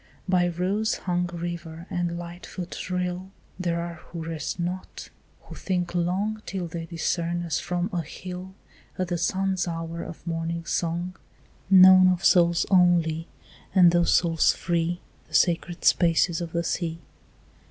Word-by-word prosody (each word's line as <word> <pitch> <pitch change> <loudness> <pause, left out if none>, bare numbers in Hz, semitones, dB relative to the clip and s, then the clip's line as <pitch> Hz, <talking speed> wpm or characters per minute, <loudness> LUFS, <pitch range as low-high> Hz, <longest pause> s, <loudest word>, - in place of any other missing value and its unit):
By 180 -1 +3
rose 190 +6 0
hung 180 -1 -1
river 170 -1 -6
and 175 -1 -1
light 175 +1 -8
foot 180 0 -6
rill 180 +1 -2 0.3
There 170 -2 -1
are 170 0 -4
who 170 -1 -6
rest 165 +1 -4
not; 180 +2 -5 0.3
who - - -11
think 180 -2 -2
long 190 +5 -1
Till 190 -3 -3
they 165 0 -6
discern 170 0 -1
as 165 -3 -1
from 175 0 -2
a 175 - 0
hill 180 +4 -8 0.4
At 185 -1 -2
the 175 -1 -1
sun's 190 +1 0
hour 165 0 -4
of 165 - -9
morning 165 0 -3
song, 175 +2 -2 0.5
Known 185 -1 +8
of 180 0 +1
souls 170 -1 +4
only, 170 -3 +3 0.5
and 180 -2 +7
those 175 0 +3
souls 165 -2 +3
free, 170 0 -1 0.3
The - - -7
sacred 175 0 +1
spaces 170 0 +3
of 170 -1 -5
the 170 0 -1
sea. 165 -1 -2
175 Hz, 150 wpm, -26 LUFS, 170-180 Hz, 0.5 s, Known